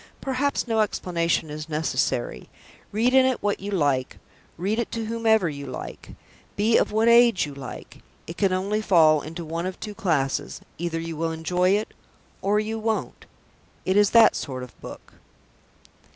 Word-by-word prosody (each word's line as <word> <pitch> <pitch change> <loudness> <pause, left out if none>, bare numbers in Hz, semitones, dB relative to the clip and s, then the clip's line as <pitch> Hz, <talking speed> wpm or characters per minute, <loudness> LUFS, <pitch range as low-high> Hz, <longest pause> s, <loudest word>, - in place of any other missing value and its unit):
Perhaps 270 0 -1
no 225 -1 +1
explanation 170 -6 0
is 155 +1 -7
necessary. 160 - -1 0.4
Read 230 +4 +1
in 265 0 +7
it 260 -4 0
what 205 -1 0
you 200 - -6
like; 145 -9 0 0.4
read 200 +6 -1
it 235 - -2
to 230 -1 -3
whomever 220 -3 +2
you 140 -2 -6
like; 130 - -8 0.4
be 220 +3 +2
of - - +3
what 220 +2 +2
age 235 -5 +5
you 145 - -8
like; 135 -2 -9 0.3
it 165 - -8
can 195 0 +1
only 200 +3 0
fall 160 -7 +5
into 165 +3 -7
one 165 +3 -3
of 185 - -6
two 210 - -6
classes. 150 -9 -1 0.2
Either 170 -1 -2
you 165 0 -5
will 165 +1 -1
enjoy 180 +3 0
it, 205 +3 +1 0.5
or 205 +2 +2
you 220 +1 -3
won't. 220 0 -3 0.6
It 185 - +1
is 205 0 +5
that 230 -1 +6
sort 130 -3 -5
of 125 - -13
book. - - -11
190 Hz, 170 wpm, -24 LUFS, 160-220 Hz, 0.6 s, in